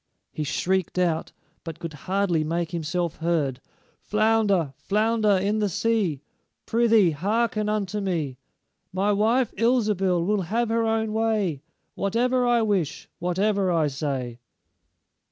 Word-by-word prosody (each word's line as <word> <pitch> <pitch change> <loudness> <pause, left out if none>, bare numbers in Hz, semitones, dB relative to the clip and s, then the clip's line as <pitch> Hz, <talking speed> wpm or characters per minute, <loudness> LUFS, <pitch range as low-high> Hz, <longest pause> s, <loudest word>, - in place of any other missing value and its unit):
He 155 - -4
shrieked 185 +5 -1
out, 170 -3 0 0.3
but 165 -2 -7
could 165 -2 -6 0.2
hardly 190 -5 +1
make 165 +2 -2
himself 170 0 -2
heard: 160 -6 -1 0.4
"Flounder, 210 -8 +2
flounder 215 +1 +1
in 205 +3 0
the 210 -1 +1
sea, 190 -7 0 0.4
Prythee, 225 -6 +4
hearken 210 +6 0
unto 210 -1 -1
me: 160 -9 -2 0.5
My 195 +2 +1
wife, 225 +4 +2
Ilsebil, 210 -7 +2
will 205 +1 +1
have 220 +6 -1
her 230 0 +1
own 220 -1 0
way 215 -9 0 0.3
Whatever 245 +5 +1
I 240 -1 +3
wish, 195 -8 -1
whatever 190 +2 +1
I 165 -3 +2
say." 135 -4 -4
195 Hz, 125 wpm, -25 LUFS, 170-220 Hz, 0.5 s, Prythee